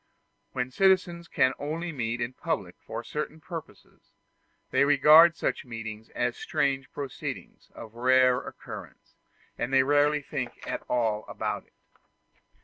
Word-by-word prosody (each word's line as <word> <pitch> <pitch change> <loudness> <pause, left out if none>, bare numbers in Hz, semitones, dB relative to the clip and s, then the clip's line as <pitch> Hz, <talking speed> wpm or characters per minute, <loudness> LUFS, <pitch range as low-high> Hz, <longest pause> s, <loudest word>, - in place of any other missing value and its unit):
When 125 0 -2
citizens 180 0 +2
can 130 -3 +2
only 165 +4 -3
meet 120 -4 -3
in 120 +2 -2
public 115 - -3
for 115 +1 -6
certain 150 +3 -5
purposes, 165 0 -10 0.6
they - - +4
regard 150 +4 +7
such - - -1
meetings 115 -3 -7
as 120 0 0
a - - -14
strange 135 -1 -1
proceeding 140 -3 -6 0.2
of 110 - -10
rare 125 +1 +4
occurrence, - - -10 0.5
and 120 - -2
they 135 -1 +5
rarely 145 +1 +3
think 130 -4 -4
at - - -3
all 110 -3 +1
about - - -4
it. - - -34
135 Hz, 140 wpm, -28 LUFS, 120-150 Hz, 0.6 s, regard